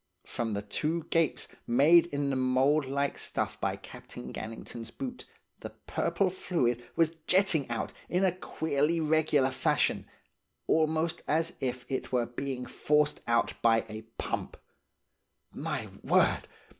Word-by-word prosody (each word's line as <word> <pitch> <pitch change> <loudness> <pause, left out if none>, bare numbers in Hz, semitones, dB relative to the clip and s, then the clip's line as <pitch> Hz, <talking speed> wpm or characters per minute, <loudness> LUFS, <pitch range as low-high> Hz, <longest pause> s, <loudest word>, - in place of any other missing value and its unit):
From 115 -2 -2
the 100 0 -2
two 155 +10 -1
gapes 165 -2 +2 0.2
made 155 +8 +6
in 145 -3 -1
the - - 0
mould 130 +3 +3
like 140 +1 -1
stuff - - -2
by - - 0
Captain - - -10
Gannington's 115 +1 -7
boot, 255 -2 -6 0.3
the - - -6
purple 195 -2 -1
fluid 125 -10 0
was 165 0 +2
jetting 180 -7 +3
out 115 - -3 0.2
in 180 +2 +2
a 185 - +4
queerly 160 -2 0
regular 155 -4 +3
fashion, - - +1 0.6
almost 160 +1 +1
as 165 +2 +1
if 125 -1 -3
it 130 - -3
were 125 -2 +2
being 125 +1 -4
forced 150 0 +1
out 115 0 +2
by 115 -1 +4
a 110 0 -6 0.2
pump. - - -3 1.0
My - - -3 0.2
word! - - +3
145 Hz, 135 wpm, -30 LUFS, 125-165 Hz, 1.0 s, made